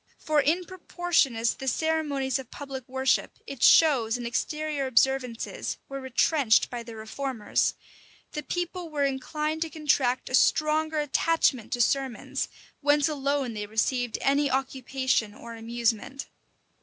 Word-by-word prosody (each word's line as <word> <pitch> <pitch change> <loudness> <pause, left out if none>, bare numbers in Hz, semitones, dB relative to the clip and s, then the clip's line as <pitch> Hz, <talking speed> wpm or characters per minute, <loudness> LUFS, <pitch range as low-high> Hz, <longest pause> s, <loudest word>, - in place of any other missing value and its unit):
For 305 -1 +2
in 340 +6 +1
proportion 350 -7 0
as 230 +1 +1
the 265 - -8
ceremonies 285 -2 0
of 260 -3 -9
public 270 -3 -8
worship, 265 0 0
its 275 -4 +3
shows 250 -8 +5
and 240 - -6
exterior 295 +4 -2
observances, 255 -2 0
were 275 0 -6
retrenched 260 -1 +2
by 240 -1 -4
the 230 -1 -10
reformers, 220 +1 -1 0.6
the 300 - -4
people 350 +2 -4
were 295 -2 -1
inclined 300 +4 -2
to 325 - -1
contract 285 -5 +1
a - - -7
stronger 310 +3 +3
attachment 295 -4 +1
to 245 - 0
sermons, 265 -2 0 0.3
whence 290 0 +3
alone 280 -4 -1
they 210 -1 -5
received 240 +3 0
any 280 +1 +3
occupation 260 -4 -1
or 235 +1 -9
amusement. 235 +3 -2
270 Hz, 135 wpm, -27 LUFS, 245-300 Hz, 0.6 s, shows